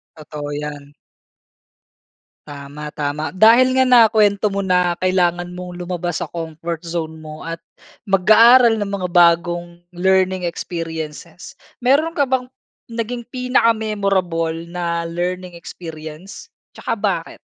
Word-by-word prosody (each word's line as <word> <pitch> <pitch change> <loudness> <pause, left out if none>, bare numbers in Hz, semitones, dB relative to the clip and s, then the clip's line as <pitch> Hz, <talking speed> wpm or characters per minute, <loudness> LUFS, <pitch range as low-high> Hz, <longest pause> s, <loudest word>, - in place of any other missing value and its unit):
Totoo 150 -1 -7
‘yan. 145 -1 -6 1.5
Tama, 145 +1 -8
tama. 150 +1 -3
Dahil 245 +5 +6
nga 260 - +5
nakuwento 215 -4 +4
mo 200 0 -3
na 180 -2 +2
kailangan 175 -1 0
mong 180 0 -8
lumabas 175 -1 -3
sa - - -7
comfort 165 0 -5
zone 165 -2 -5
mo 155 0 -10
at 165 0 -6 0.5
mag-aaral 225 +4 +6
ng 205 - -2
mga 180 -2 -3
bagong 175 0 +3 0.2
learning 185 0 +1
experiences 165 -1 -6 0.3
meron 310 +6 +2
ka 285 - +3
bang 260 -1 -1 0.4
naging 235 +1 -4
pinaka-memorable 205 -9 0 0.2
na 170 -1 -2
learning 180 +2 -4
experiences? 165 - -10 0.2
Tsaka - - -4
bakit? - - -2
175 Hz, 115 wpm, -19 LUFS, 165-210 Hz, 1.5 s, Dahil